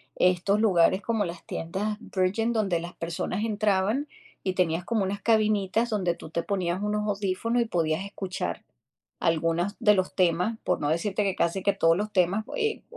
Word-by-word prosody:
estos 185 Hz, +3 st, +2 dB
lugares 190 Hz, -2 st, +3 dB
como 225 Hz, -3 st, 0 dB
las 170 Hz, 0 st, -7 dB
tiendas 205 Hz, +6 st, -3 dB
Virgin 215 Hz, +3 st, 0 dB
donde 195 Hz, -6 st, +1 dB
las 170 Hz, +1 st, -8 dB
personas 170 Hz, +4 st, -3 dB
entraban 215 Hz, +5 st, +1 dB, 0.4 s
y 185 Hz, -, 0 dB
tenías 175 Hz, -1 st, +1 dB
como 220 Hz, -1 st, 0 dB
unas 200 Hz, +1 st, -3 dB
cabinitas 215 Hz, 0 st, +2 dB
donde 180 Hz, -5 st, 0 dB
tú 160 Hz, -, -11 dB
te 170 Hz, -, -1 dB
ponías 185 Hz, -1 st, -1 dB
unos 210 Hz, 0 st, -1 dB
audífonos 205 Hz, +4 st, 0 dB
y -, -, +1 dB
podías 165 Hz, -3 st, 0 dB
escuchar 185 Hz, -, -4 dB, 0.6 s
algunas 165 Hz, +4 st, +1 dB
de 210 Hz, -3 st, +5 dB
los 185 Hz, -1 st, -1 dB
temas, 180 Hz, +5 st, +1 dB
por -, -, 0 dB
no 145 Hz, -, -1 dB
decirte 195 Hz, +5 st, 0 dB
que 195 Hz, -2 st, 0 dB
casi 175 Hz, +3 st, 0 dB
que 200 Hz, -1 st, +3 dB
todos 165 Hz, -3 st, +3 dB
los 210 Hz, +2 st, -2 dB
temas, 190 Hz, +3 st, +2 dB
eh, 445 Hz, -2 st, -1 dB
195 Hz, 175 wpm, -27 LUFS, 175-215 Hz, 0.6 s, de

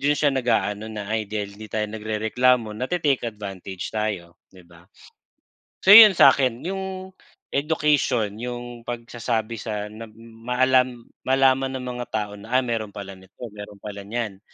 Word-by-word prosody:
do'n 145 Hz, +1 st, +2 dB
siya 145 Hz, 0 st, +2 dB
nag-aano 110 Hz, -4 st, 0 dB
na, 105 Hz, -2 st, -6 dB
"Ay, 110 Hz, -1 st, 0 dB
dahil 105 Hz, -2 st, -4 dB
'di 110 Hz, 0 st, -10 dB
tayo 110 Hz, -1 st, -1 dB
nagrereklamo, 110 Hz, +2 st, +1 dB
nate-take 135 Hz, -1 st, 0 dB
advantage 95 Hz, -3 st, -7 dB
tayo", 105 Hz, -6 st, -3 dB
'di 90 Hz, -2 st, -16 dB
ba? 85 Hz, 0 st, -18 dB, 1.0 s
So 195 Hz, -, +8 dB
'yon 215 Hz, -3 st, +11 dB
sa'kin, 130 Hz, -3 st, +5 dB
yung 190 Hz, 0 st, -5 dB, 0.4 s
education, 140 Hz, -7 st, +1 dB
yung 120 Hz, -1 st, -6 dB
pagsasabi 115 Hz, -1 st, -3 dB
sa 105 Hz, -2 st, -4 dB
na 115 Hz, +1 st, -9 dB, 0.4 s
maalam 125 Hz, -1 st, +2 dB, 0.2 s
malaman 135 Hz, 0 st, +3 dB
ng 125 Hz, -, -6 dB
mga 125 Hz, -1 st, -5 dB
tao 105 Hz, -1 st, -2 dB
na, 110 Hz, +4 st, -11 dB
ah, 130 Hz, -, +1 dB
mayro'n 115 Hz, -3 st, -2 dB
pala 100 Hz, -1 st, -7 dB
nito, 95 Hz, 0 st, -21 dB, 0.2 s
mayro'n 105 Hz, -1 st, -10 dB
pala 100 Hz, -1 st, -6 dB
niyan. 110 Hz, -3 st, -4 dB
115 Hz, 150 wpm, -23 LUFS, 105-130 Hz, 1.0 s, yon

